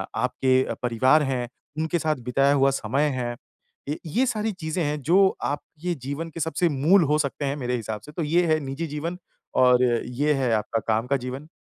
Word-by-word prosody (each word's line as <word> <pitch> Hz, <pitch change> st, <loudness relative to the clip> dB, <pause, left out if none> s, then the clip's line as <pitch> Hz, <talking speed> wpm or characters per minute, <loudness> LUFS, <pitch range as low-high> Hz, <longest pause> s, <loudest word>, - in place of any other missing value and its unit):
आपके 130 Hz, 0 st, +2 dB
अ, -, -, -3 dB
परिवार 130 Hz, +6 st, +4 dB
है, 130 Hz, -3 st, -1 dB, 0.3 s
उनके 160 Hz, +2 st, 0 dB
साथ 155 Hz, 0 st, 0 dB
बिताया 135 Hz, +3 st, +3 dB
हुआ 135 Hz, -1 st, +4 dB
समय 135 Hz, +3 st, 0 dB, 0.2 s
है। 120 Hz, -1 st, -3 dB, 0.5 s
य 150 Hz, -, -1 dB
ये 220 Hz, -, +1 dB
सारी 220 Hz, -3 st, -1 dB
चीज़ें 170 Hz, -2 st, -3 dB
हैं 150 Hz, 0 st, -2 dB
जो 170 Hz, +8 st, +3 dB, 0.3 s
आपके 155 Hz, +4 st, -3 dB
जीवन 145 Hz, +5 st, -4 dB
के 165 Hz, -, -9 dB
सबसे 160 Hz, +2 st, +1 dB
मूल 160 Hz, +6 st, +4 dB
हो 150 Hz, -, +4 dB
सकते 145 Hz, 0 st, -2 dB
हैं 140 Hz, -, -1 dB
मेरे 125 Hz, -3 st, -2 dB
हिसाब 110 Hz, -3 st, -4 dB
से -, -, -11 dB
तो 165 Hz, +2 st, -3 dB
ये 170 Hz, +4 st, +2 dB
है 155 Hz, -1 st, +3 dB
निजी 140 Hz, +4 st, -4 dB
जीवन 160 Hz, +4 st, -4 dB, 0.4 s
और 125 Hz, 0 st, +5 dB
ये 125 Hz, +4 st, +1 dB
है 130 Hz, -4 st, 0 dB
आपका 110 Hz, +1 st, 0 dB
काम 110 Hz, +2 st, +1 dB
का 140 Hz, +1 st, +2 dB
जीवन। 130 Hz, +4 st, -6 dB
145 Hz, 200 wpm, -25 LUFS, 125-160 Hz, 0.5 s, और